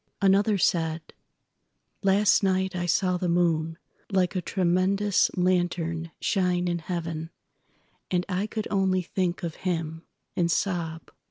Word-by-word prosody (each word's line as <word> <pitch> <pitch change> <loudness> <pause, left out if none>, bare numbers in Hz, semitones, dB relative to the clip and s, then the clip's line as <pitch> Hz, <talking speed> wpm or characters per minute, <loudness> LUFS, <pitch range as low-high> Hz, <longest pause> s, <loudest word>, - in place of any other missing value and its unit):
Another 200 +1 +3
said: 165 -3 0 0.9
"Last 195 +1 +4
night 190 -1 +1
I 175 -1 -2
saw 180 0 +2
the 180 0 -2
moonLike 170 +2 0
a 185 - 0
tremendous 190 +3 +2
lantern 175 -2 0
shine 180 -2 +1
in 175 -1 0
heaven, 165 -1 -4 0.8
And 180 -1 0
I 190 +2 -1
could 215 0 -4
only 190 -2 +2
think 180 0 -2
of 165 -2 -4
him—and 165 0 -3
sob. 170 -4 -2
180 Hz, 115 wpm, -26 LUFS, 170-190 Hz, 0.9 s, Last